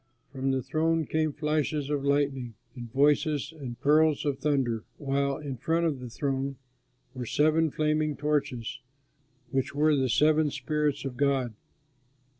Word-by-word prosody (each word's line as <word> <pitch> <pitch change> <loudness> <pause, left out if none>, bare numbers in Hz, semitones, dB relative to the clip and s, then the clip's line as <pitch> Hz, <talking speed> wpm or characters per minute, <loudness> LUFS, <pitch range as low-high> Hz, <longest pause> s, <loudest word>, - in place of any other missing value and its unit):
From 135 0 -2
the 130 -1 0
throne 160 +2 +1
came 155 +1 0
flashes 150 -1 -1
of 145 -2 -1
lightning 140 -4 0 0.2
and 120 -2 -8
voices 145 +2 +2
and 125 -6 -7
peals 155 +1 +4
of 140 -2 -1
thunder, 130 -6 0
while 140 -1 0
in 145 -4 -6
front 165 +7 0
of 150 -5 0
the 125 -1 -7
throne 135 +2 -2 0.6
were 125 -3 -5
seven 155 +4 +3
flaming 155 0 0
torches, 140 -6 -1 0.7
which 135 +1 -1
were 150 +1 +4
the 130 -2 +1
seven 155 +4 +4
spirits 150 -1 -1
of 130 -2 -5
God. 135 -4 +1
145 Hz, 145 wpm, -28 LUFS, 135-150 Hz, 0.7 s, peals